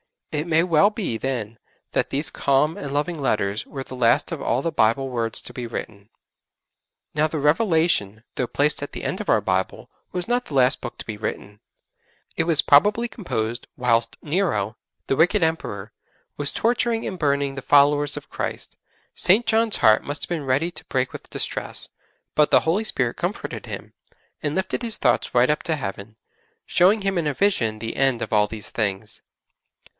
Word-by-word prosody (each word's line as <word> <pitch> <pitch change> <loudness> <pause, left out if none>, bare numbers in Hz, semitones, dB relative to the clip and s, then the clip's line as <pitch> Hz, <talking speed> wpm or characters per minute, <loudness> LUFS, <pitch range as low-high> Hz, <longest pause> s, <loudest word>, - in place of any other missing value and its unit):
It 150 +2 -2
may 165 0 +3
well 175 +3 +4
be 205 - -3
then 115 -4 -4 0.3
that - - 0
these 145 +3 0
calm 140 +3 +2
and 140 - -5
loving 150 +3 -1
letters 105 -5 0
were 135 -2 -6
the 130 - -9
last 125 +6 +3
of 160 -4 -4
all 125 - 0
the 165 - 0
Bible 135 0 +2
words 115 -2 -2
to - - -11
be 125 -2 -5
written. 105 -2 -7 1.0
Now 150 +1 +2
the 155 - -4
'Revelation,' 150 - +2
though 125 - -1
placed 145 +4 +1
at 145 - -6
the - - -6
end - - -2
of - - -6
our - - +4
Bible, 95 0 -2 0.2
was 180 +3 -4
not 245 0 +1
the - - -10
last 130 0 +4
Book 120 - -7
to - - -7
be 110 -2 -5
written. 105 -1 -5 0.8
It - - +2
was 160 -3 +3
probably 205 +11 +4
composed 115 - -4
whilst 115 -2 +1
Nero, 145 - 0 0.3
the 135 - 0
wicked 165 +1 +4
Emperor, 115 -11 -2 0.5
was 145 -1 -2
torturing 235 -1 +1
and 185 - -5
burning 140 -2 +1
the 135 - -6
followers 145 +1 +4
of - - -9
Christ. - - -5 0.4
St. 210 +7 +4
John's 225 -1 +2
heart 110 0 +5
must 145 +1 -5
have - - -4
been 165 -5 -3
ready 140 +7 +1
to 165 - -6
break 130 -1 -1
with - - -9
distress, - - -2 0.5
but 150 -1 +4
the - - +5
Holy 185 +7 0
Spirit 125 - -1
comforted - - -4
him, - - -7 0.5
and 150 0 -2
lifted 190 +4 -1
his 230 -2 +1
thoughts - - +1
right 125 +2 +5
up 150 - +1
to 160 - 0
Heaven, 105 -4 -6 0.5
showing 195 +5 +4
him 195 -1 0
in 160 - -1
a 145 - 0
vision 115 - +1
the 115 +1 -5
end 135 -3 +2
of - - -6
all 105 -1 +4
these 105 -1 -8
things. 105 -1 -3
140 Hz, 190 wpm, -23 LUFS, 115-165 Hz, 1.0 s, heart